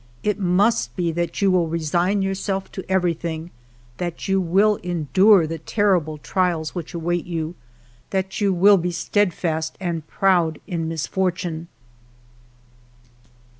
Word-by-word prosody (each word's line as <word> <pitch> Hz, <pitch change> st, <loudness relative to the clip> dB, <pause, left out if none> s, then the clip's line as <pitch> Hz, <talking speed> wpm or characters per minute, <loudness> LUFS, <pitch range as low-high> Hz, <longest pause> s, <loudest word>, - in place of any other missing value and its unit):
It 210 Hz, 0 st, 0 dB
must 180 Hz, -, +2 dB
be 170 Hz, -2 st, 0 dB
that 170 Hz, +4 st, -2 dB
you 195 Hz, -, +4 dB
will 180 Hz, -2 st, +2 dB
re 165 Hz, +1 st, -2 dB
sign 175 Hz, +5 st, +1 dB
yourself 195 Hz, 0 st, -2 dB
to 190 Hz, -, -6 dB
everything, 170 Hz, -3 st, -1 dB, 0.5 s
that 175 Hz, -2 st, -4 dB
you 195 Hz, 0 st, +2 dB
will 195 Hz, +4 st, +3 dB
endure 180 Hz, +3 st, +3 dB
the 165 Hz, +1 st, -5 dB
terrible 175 Hz, -4 st, +1 dB
trials 170 Hz, -1 st, -1 dB
which 175 Hz, 0 st, -6 dB
await 175 Hz, +1 st, -2 dB
you, 165 Hz, -1 st, -3 dB, 0.6 s
that 190 Hz, +1 st, -2 dB
you 200 Hz, -1 st, +3 dB
will 195 Hz, +3 st, +6 dB
be 180 Hz, 0 st, -1 dB
steadfast 170 Hz, -3 st, -1 dB
and 170 Hz, -4 st, -3 dB
proud 175 Hz, -5 st, +2 dB
in 170 Hz, -5 st, -3 dB
misfortune." 170 Hz, 0 st, -2 dB
175 Hz, 130 wpm, -22 LUFS, 165-190 Hz, 0.6 s, will